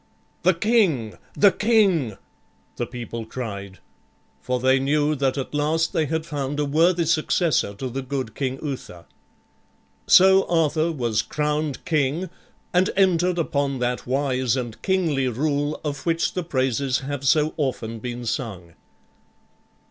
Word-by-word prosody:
"The 185 0 +3
king, 170 - +1 0.2
the 200 -1 +6
king!" 195 - +2 0.6
the 120 - -2
people 115 -2 -6
cried; 100 -5 -6 0.6
for 125 0 -1
they 130 +1 +3
knew 145 +2 +1
that 135 -1 0
at 135 - -4
last 155 +3 0
they 155 - +1
had 160 +1 -2
found 145 -2 -3
a 150 - +1
worthy 165 +4 +2
successor 160 - +1
to 130 - -4
the 130 +2 -4
good 130 -4 -4
King 130 0 -2
Uther. 125 - -6 1.0
So 190 +1 +6
Arthur 165 -1 +1
was 120 -7 0
crowned 150 -1 -2
king 155 +4 0 0.4
and 180 +2 +3
entered 180 -2 +3
upon 140 -4 0
that 125 0 -2
wise 130 -2 0
and 120 -3 -5
kingly 165 -9 +1
rule 145 +4 -1
of 145 -3 -4
which 165 0 0
the 180 - -1
praises 135 -3 0
have 140 0 -5
so 150 +2 +3
often 115 -6 -2
been 120 +1 -6
sung. 95 -8 -4
145 Hz, 140 wpm, -23 LUFS, 125-165 Hz, 1.0 s, the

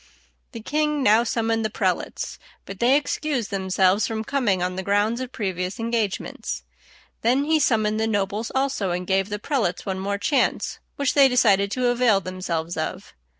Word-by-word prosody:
The 230 - -7
king 300 +3 0
now 220 +2 +5
summoned 225 -1 0
the 220 - 0
prelates; - - -2 0.3
but 195 -1 -9
they 250 +3 +4
excused 290 -5 -2
themselves 190 +1 +2
from 220 -1 -3
coming 215 -8 0
on 180 0 -2
the 190 - -3
grounds 205 +5 +1
of 255 -1 -5
previous 185 -1 -3
engagements. 225 -3 -2 0.6
Then 250 +5 +2
he 315 +1 +2
summoned 215 -5 +2
the 220 - +1
nobles 205 +1 -1
also, 265 -7 0
and 180 +1 -2
gave 195 +1 +1
the 210 - -2
prelates 210 - -1
one 190 -2 -3
more 200 +1 -2
chance, 275 +8 0 0.2
which 280 -2 0
they 275 -2 +6
decided 205 -6 +3
to 250 -1 +1
avail 240 -4 +3
themselves 180 -3 -4
of. - - -4
220 Hz, 170 wpm, -23 LUFS, 195-250 Hz, 0.6 s, they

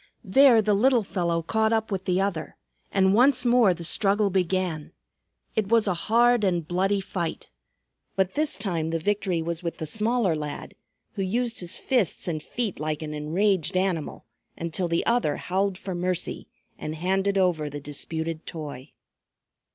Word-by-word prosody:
There 235 +2 +6
the 210 0 +2
little 240 +3 +3
fellow 170 -4 -1
caught 220 +5 +1
up 220 -1 0
with 190 -1 -3
the 180 0 +1
other, 195 -5 -2 0.3
and 190 -1 +3
once 250 +3 +4
more 240 -4 +5
the 175 -1 -4
struggle 200 +3 +2
began. 180 -4 -1 0.6
It 215 -3 0
was 230 -2 +4
a 190 - +2
hard 235 +6 +3
and 175 -5 0
bloody 195 +3 +1
fight. 175 -4 -4 0.7
But 190 -1 +1
this 305 0 0
time 170 -6 -1
the 165 - 0
victory 185 -1 -1
was 170 +1 -3
with 170 -2 -4
the 160 - -4
smaller 215 +1 +1
lad, 150 -1 -6 0.4
who 200 - -4
used 230 +5 0
his 175 -2 -2
fists 240 -11 0
and 155 -3 -2
feet 230 0 -3
like 155 0 -2
an 150 -1 -5
enraged 180 +4 0
animal, 185 -5 -2 0.3
until 170 +2 -2
the 170 0 0
other 235 -11 +1
howled 190 +1 -1
for 190 0 -5
mercy 180 0 -2 0.3
and 155 - -4
handed 190 +4 0
over 175 -5 +1
the 145 0 -6
disputed 160 +3 -4
toy. 145 -5 -7
185 Hz, 165 wpm, -25 LUFS, 165-210 Hz, 0.7 s, There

